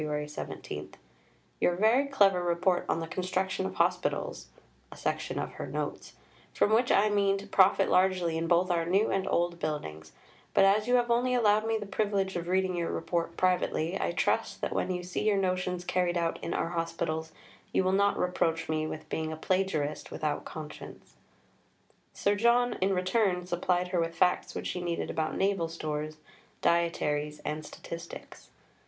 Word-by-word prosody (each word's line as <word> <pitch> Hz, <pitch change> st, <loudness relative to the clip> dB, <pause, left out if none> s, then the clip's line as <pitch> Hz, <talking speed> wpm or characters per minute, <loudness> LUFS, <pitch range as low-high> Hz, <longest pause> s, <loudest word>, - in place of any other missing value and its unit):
17), 75 Hz, -, -7 dB, 0.6 s
"your 175 Hz, -, +2 dB
very 225 Hz, +8 st, +3 dB
clever 200 Hz, -9 st, +4 dB
Report 175 Hz, +1 st, +1 dB
on 165 Hz, -, +1 dB
the -, -, -2 dB
Construction 185 Hz, +2 st, -1 dB
of -, -, -7 dB
Hospitals -, -, 0 dB, 0.4 s
[a -, -, -11 dB
section -, -, -2 dB
of -, -, -3 dB
her -, -, -6 dB
Notes], -, -, -4 dB, 0.4 s
from 215 Hz, -, +3 dB
which 240 Hz, +3 st, +3 dB
I 205 Hz, +2 st, +5 dB
mean 200 Hz, -1 st, +2 dB
to 200 Hz, -, -8 dB
profit 195 Hz, -1 st, +4 dB
largely 180 Hz, -2 st, +2 dB
in 165 Hz, +1 st, -1 dB
both 175 Hz, +2 st, +3 dB
our 170 Hz, -1 st, +1 dB
new 190 Hz, +6 st, +2 dB
and 195 Hz, 0 st, 0 dB
old 170 Hz, 0 st, 0 dB
buildings; 80 Hz, -, -4 dB, 0.4 s
but -, -, +6 dB
as 210 Hz, +3 st, +3 dB
you 250 Hz, -, +4 dB
have 240 Hz, -1 st, +2 dB
only 250 Hz, +2 st, +2 dB
allowed 215 Hz, -2 st, +3 dB
me 225 Hz, 0 st, +1 dB
the 210 Hz, -, -5 dB
privilege 195 Hz, -1 st, -1 dB
of 170 Hz, -1 st, -3 dB
reading 185 Hz, 0 st, +1 dB
your 170 Hz, -1 st, -1 dB
Report 170 Hz, 0 st, -2 dB
privately, 180 Hz, -2 st, +1 dB
I -, -, 0 dB
trust -, -, 0 dB
that -, -, -2 dB
when -, -, -1 dB
you 180 Hz, -1 st, -2 dB
see 180 Hz, 0 st, -3 dB
your 205 Hz, -2 st, +3 dB
notions 185 Hz, -1 st, -1 dB
carried 180 Hz, -1 st, +1 dB
out 170 Hz, -1 st, -1 dB
in 170 Hz, -, -2 dB
our -, -, -1 dB
Hospitals 165 Hz, -1 st, -2 dB, 0.4 s
you -, -, +2 dB
will 185 Hz, -, +2 dB
not 200 Hz, +1 st, +3 dB
reproach 165 Hz, -2 st, 0 dB
me 155 Hz, 0 st, -1 dB
with 155 Hz, 0 st, -7 dB
being 160 Hz, 0 st, -3 dB
a 160 Hz, -, -5 dB
plagiarist 160 Hz, -4 st, -1 dB
without 150 Hz, -1 st, -2 dB
conscience." 155 Hz, -1 st, -9 dB, 1.0 s
Sir 200 Hz, -, +1 dB
John 235 Hz, +3 st, +3 dB
in 190 Hz, +1 st, +2 dB
return 185 Hz, -1 st, +1 dB
supplied 180 Hz, 0 st, 0 dB
her 180 Hz, -1 st, 0 dB
with 165 Hz, 0 st, -1 dB
facts 180 Hz, 0 st, +1 dB
which -, -, -4 dB
she 180 Hz, -, -3 dB
needed 170 Hz, -1 st, -2 dB
about 160 Hz, -1 st, -2 dB
naval 195 Hz, -4 st, +1 dB
stores, 155 Hz, -1 st, -4 dB, 0.5 s
dietaries, 150 Hz, -3 st, +1 dB
and 155 Hz, +1 st, -3 dB
statistics. 170 Hz, +2 st, -9 dB
180 Hz, 175 wpm, -29 LUFS, 165-195 Hz, 1.0 s, but